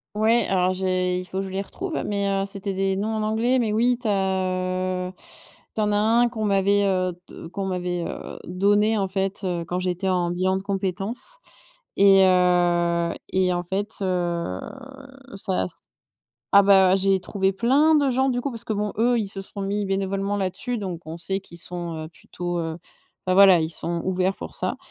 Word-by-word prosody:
Ouais, 225 +3 +3
alors 185 -1 +2
j'ai 185 -1 0
il 185 - -6
faut 190 +1 -3
je 195 - -5
les 190 +1 -2
retrouve, 350 - -4
mais 200 -1 -1
heu, 195 0 0
c'était 200 0 -4
des 195 0 0
noms 215 +3 -1
en 215 - -1
anglais, 225 +4 +1
mais 225 -3 0
oui, 240 +3 +2
tu 245 -2 -4
as, 185 -1 -1
heu, - - -7 0.6
tu - - -4
en 210 -1 +1
as - - +2
1 225 +3 +4
qu'on 230 -2 -4
m'avait, 200 0 +3
heu 185 -2 +1 0.2
de - - -9
qu'on 195 +3 -4
m'avait, 180 -2 -2
heu, - - -7
donné 205 +4 +2
en 195 -2 0
fait, 195 +1 -2
heu, 175 -2 -1
quand 175 +2 -3
j'étais 185 +1 -1
en 175 -2 +1
bilan 185 +2 +1
de 190 - -6
compétences 195 - -2 0.6
et 195 -1 +6
heu 175 -2 +2 0.2
et 185 -1 +2
en 175 0 -2
fait, 195 +4 -3
heu, 175 - -1 0.8
ça 195 - -1
s 90 - -6 0.7
ah 200 - +8
bah 190 -2 +6
j'ai 195 0 +3
trouvé 195 0 0
plein 275 +10 +4
de 285 -2 +3
gens 265 +2 +2
du 245 -2 0
coup, 280 - -3
parce 230 0 -7
que 220 - -2
bon, 210 0 -2
eux, 240 +2 +3
ils 215 - -1
se 195 0 -5
sont 200 +1 -8
mis 200 +1 -1
bénévolement 195 +1 -1
là-dessus 195 +6 -2
donc 180 -4 -5
on 160 +1 -6
sait 190 +3 -2
qu'ils 170 -3 -13
sont, 175 -1 -5
heu, - - -8
plutôt 175 +1 -5
heu 160 -1 -4 0.5
bah 185 - +2
voilà 190 -2 +7
ils 160 - -1
sont 170 +1 -3
ouverts 185 +1 0
pour - - -7
ça. - - -1
195 Hz, 200 wpm, -24 LUFS, 180-205 Hz, 0.8 s, ah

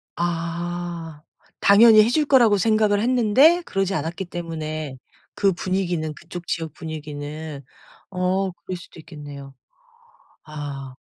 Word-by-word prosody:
아. 170 -1 -4 0.4
당연히 215 +2 +8
해 220 - +1
줄 300 +4 +2
거라고 240 -7 +5
생각을 215 0 +2
했는데 255 +8 +4
그러지 195 0 -1
않았기 170 +3 -3
때문에 155 -4 -5 0.4
그 200 -1 +3
분위기는 175 -4 -2
그쪽 170 +3 -9
지역 160 -3 -3
분위기는 150 -1 -7 0.5
어 185 +1 0
그럴 180 +1 -7
수도 170 - -14
있겠네요. 145 -4 -10 0.9
아. 145 -3 -7
175 Hz, 255 characters per minute, -23 LUFS, 155-200 Hz, 0.9 s, 당연히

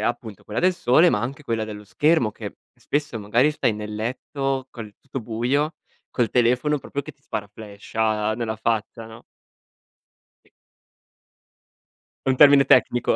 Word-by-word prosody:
appunto 115 -3 -4
quella 105 - -3
del 185 +1 +3
sole, 155 +3 +4
ma 105 - +1
anche 135 +5 -5
quella 115 -5 -2
dello 105 -1 -8
schermo 145 - +2
che - - -9 0.2
spesso 145 -5 -3
magari 115 +8 +2
stai 150 -6 0
nel 105 0 -6
letto 130 +4 -3
col 110 -4 -9
tutto 135 -1 -6
buio, 125 +7 -1 0.4
col 120 -3 0
telefono 125 +5 +2
proprio 140 - -5
che 140 - -10
ti 140 - -40
sparaflasha 105 0 -3
nella 110 -1 -3
faccia, 110 +1 -2
no? 115 +1 -13 1.2
Sì - - -29 1.8
È - - +4
un 130 - +3
termine 140 0 +7
tecnico. 125 -2 +3
120 Hz, 145 wpm, -23 LUFS, 110-140 Hz, 1.8 s, termine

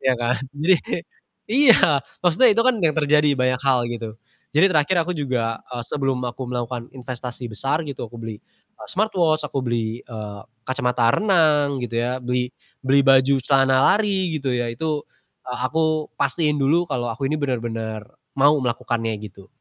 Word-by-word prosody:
Iya 130 - +2
kan, 120 +1 0 0.2
jadi 170 +6 +4
kayak 170 - -3 0.5
iya. 270 -2 +7 0.5
Maksudnya 180 +9 +5
itu 230 +2 +2
kan 255 -1 +4
yang 160 -3 +2
terjadi 150 0 +3
banyak 125 0 +1
hal 130 -2 +4
gitu. 115 -2 -5 0.5
Jadi 160 +6 +6
terakhir 155 +3 +2
aku 180 - -2
juga, 120 -5 -1
eee, 125 -1 -5
sebelum 135 -1 -1
aku 120 - -16
melakukan 120 -1 -4
investasi 125 -1 -6
besar 135 +8 -1
gitu, 135 - -5
aku 120 - -11
beli, 110 -1 -6 0.4
eee, - - -10
smartwatch, 175 -7 +1
aku 135 -1 -3
beli, 115 -1 -2
eee, 105 -3 -8 0.3
kacamata 125 -3 +1
renang 150 -9 +2
gitu 120 -1 -4
ya, 125 +2 -1
beli 125 0 -2 0.3
beli 135 +1 +4
baju 135 0 +5
celana 135 -1 +3 0.2
lari 195 -5 0
gitu 135 - -3
ya, 120 -1 -1
itu, 150 +4 -2 0.5
eee, 125 - -4
aku 155 0 0
pastiin 150 +2 +1
dulu 160 +6 +3
kalau 120 -3 -2
aku 115 +4 -4
ini 155 - 0
benar-benar 115 -5 -3 0.3
mau 140 +2 +5
melakukannya 120 -2 -2
gitu. 100 -1 -12
130 Hz, 165 wpm, -22 LUFS, 120-155 Hz, 0.5 s, iya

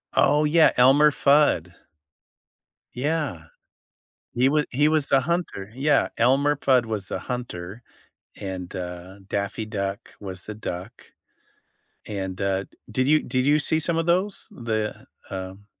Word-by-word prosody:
Oh 150 +2 +4
yeah, 160 +2 +5
Elmer 140 +4 +6
Fudd. 140 - +3 1.2
Yeah. 140 - -2 0.9
He 130 +3 +3
wa 150 0 +2
he 145 +4 +2
was 155 -2 +1
the 135 - +4
hunter, 155 - -3
yeah, 145 +3 +2
Elmer 135 +5 +3
Fudd 130 -4 +3
was 105 -3 -4
the - - -3
hunter, 115 -4 -6 0.6
and, 95 -2 -6
uh, 90 +1 -7
Daffy 100 +2 -3
Duck 100 -2 -4
was 95 -2 -7
the 105 - -6
duck. 90 -4 -8 0.9
And, 95 -2 -5
uh, 95 0 0
d - - -31 0.2
did 130 +4 0
you 155 +1 +4
did 130 0 -1
you 150 +1 +4
see 160 +2 +3
some 165 +1 +2
of 165 - 0
those, 185 +4 0
the, 110 -3 -3 0.2
um, 95 +1 -7
125 Hz, 140 wpm, -24 LUFS, 95-145 Hz, 1.2 s, Elmer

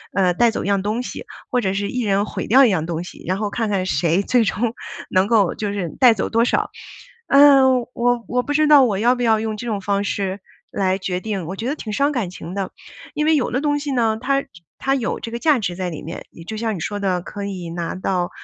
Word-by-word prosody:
呃， 185 -2 +3
带 235 +5 +3
走 - - -3
一 - - -4
样 200 -1 +2
东 215 +5 -2
西， - - -7 0.3
或 250 - +2
者 190 -4 -1
是 200 +1 -2
一 250 -1 -2
人 200 0 +1
毁 - - -5
掉 265 +4 +6
一 - - +4
样 170 -6 0
东 170 0 -3
西。 - - -11
然 185 +1 0
后 210 -1 -2
看 225 0 -2
看 195 -3 0
谁 170 +3 +1
最 240 0 +2
终 225 +4 -1 0.4
能 185 +2 +2
够 215 -6 +3
就 205 -2 -3
是 180 -5 -3
带 250 -3 +7
走 205 - -2
多 230 +1 +2
少， - - 0 0.6
呃， 275 -1 +7 0.2
我 240 -1 0
我 250 0 0
不 290 - -3
知 310 +1 +3
道 290 -3 +8
我 210 -6 +1
要 235 +5 +3
不 245 - -5
要 220 -2 +3
用 220 -1 -3
这 240 - -7
种 210 -3 -1
方 200 +1 -1
式 195 -1 -2 0.3
来 190 -1 0
决 185 -1 -3
定， 200 -6 -3
我 185 +4 -5
觉 230 +5 -4
得 290 - -1
挺 215 -8 -6
伤 280 +5 +2
感 235 -10 -2
情 180 -1 -8
的。 195 -2 -3 0.4
因 300 - -1
为 315 0 +4
有 260 - -1
的 255 - 0
东 290 -1 +1
西 290 0 -4
呢， 225 -3 +1
它 275 +1 +1 0.3
它 270 +1 0
有 240 -4 -2
这 230 - -6
个 235 - -4
价 300 -4 +3
值 180 -4 -3
在 185 -1 -2
里 155 - -7
面。 165 +3 -7
也 165 - -12
就 220 +5 -6
像 220 -1 -2
你 - - -6
说 205 +3 -3
的 185 -3 0
可 200 +2 -7
以 185 -4 -5
拿 170 +1 -4
到， 185 -1 -1
210 Hz, 280 characters per minute, -21 LUFS, 190-245 Hz, 0.6 s, 道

